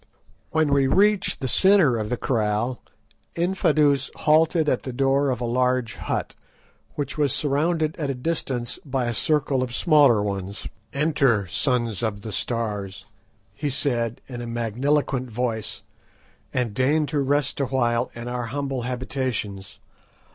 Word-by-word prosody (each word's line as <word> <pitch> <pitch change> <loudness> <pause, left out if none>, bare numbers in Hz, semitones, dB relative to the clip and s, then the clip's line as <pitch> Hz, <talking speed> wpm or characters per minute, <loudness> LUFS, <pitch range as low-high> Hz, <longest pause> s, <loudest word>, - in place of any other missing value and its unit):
When 155 -3 +2
we 140 -1 +3
reached 200 +1 +2
the 130 - -1
centre 170 - +4
of 105 -1 -3
the 125 - -1
kraal, 115 +1 -1 0.5
Infadoos 155 -6 +2
halted 155 +1 +3
at 130 - +1
the 130 - -5
door 135 +2 +2
of 125 - -1
a 120 - -2
large 125 -1 +1
hut, - - -3 0.6
which 145 +1 -4
was 145 -4 +2
surrounded 155 +2 +1
at 150 -3 -2
a 135 - -1
distance 125 -3 -3
by 135 -3 -1
a 120 - -1
circle 145 +2 +1
of 125 -2 -3
smaller 145 -10 +5
ones. 100 -1 -4 0.2
"Enter, 140 -8 +2
Sons 115 - 0
of 105 -3 -2
the 110 - -5
Stars," 100 -4 -3 0.5
he 145 +8 -3
said, 120 -4 -1
in 120 -2 -6
a 120 - -5
magniloquent 125 +3 0
voice, 115 -1 -3 0.7
"and 125 -4 -1
deign 145 +7 +2
to 145 +1 -1
rest 140 0 0
awhile 125 -3 +1
in 120 +1 -7
our 120 -1 -3
humble 135 0 -3
habitations. 125 -5 -3
130 Hz, 145 wpm, -24 LUFS, 115-145 Hz, 0.7 s, smaller